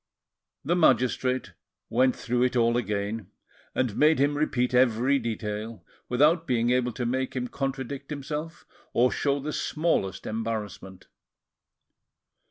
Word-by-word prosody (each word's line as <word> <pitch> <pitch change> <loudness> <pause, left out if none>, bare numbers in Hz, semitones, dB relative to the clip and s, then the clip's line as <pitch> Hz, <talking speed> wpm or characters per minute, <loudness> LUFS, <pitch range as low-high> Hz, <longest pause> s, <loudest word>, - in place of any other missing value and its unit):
The 170 +5 +2
magistrate 130 - +2 0.3
went 130 +2 +2
through 125 0 -1
it 125 0 +2
all 120 -1 +3
again, 105 -2 -2 0.5
and 125 -5 0
made 155 +1 +4
him 145 +2 +2
repeat 130 -4 0
every 125 +2 +3
detail, 110 -1 -4 0.2
without 155 +7 +3
being 120 -2 +2
able 125 -1 +2
to 120 - -3
make 130 +2 -1
him 125 -1 -2
contradict 135 +1 -4
himself 150 +3 -5 0.3
or 125 +2 +4
show 140 0 0
the 150 +2 -4
smallest 155 - -1
embarrassment. 110 -4 -5
125 Hz, 125 wpm, -27 LUFS, 115-140 Hz, 0.5 s, made